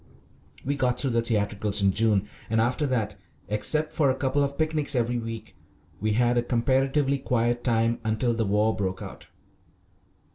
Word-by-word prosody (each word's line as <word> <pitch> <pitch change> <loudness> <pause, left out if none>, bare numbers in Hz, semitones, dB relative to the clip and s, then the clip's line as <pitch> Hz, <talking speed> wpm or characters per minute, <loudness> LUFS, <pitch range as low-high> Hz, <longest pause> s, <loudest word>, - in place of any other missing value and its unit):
We 140 +2 0
got 125 -3 0
through 135 - -1
the 115 0 +2
theatricals 105 -3 0
in 100 - +4
June, 105 -1 +2 0.2
and 110 0 +1
after 125 +6 +1
that, 110 -5 -1 0.3
except 155 +9 0
for 145 -4 +3
a 130 - +2
couple 135 +1 +1
of 140 0 -3
picnics 155 -2 0
every 120 0 0
week, 115 -4 -7 0.4
we 110 +1 0
had 120 +2 +3
a - - +2
comparatively 135 +3 +1
quiet 120 -1 0
time 115 -1 +1
until 110 +2 0
the 115 -1 0
war 105 +2 +2
broke 95 -2 -3
out. - - -10
120 Hz, 170 wpm, -26 LUFS, 110-135 Hz, 0.4 s, in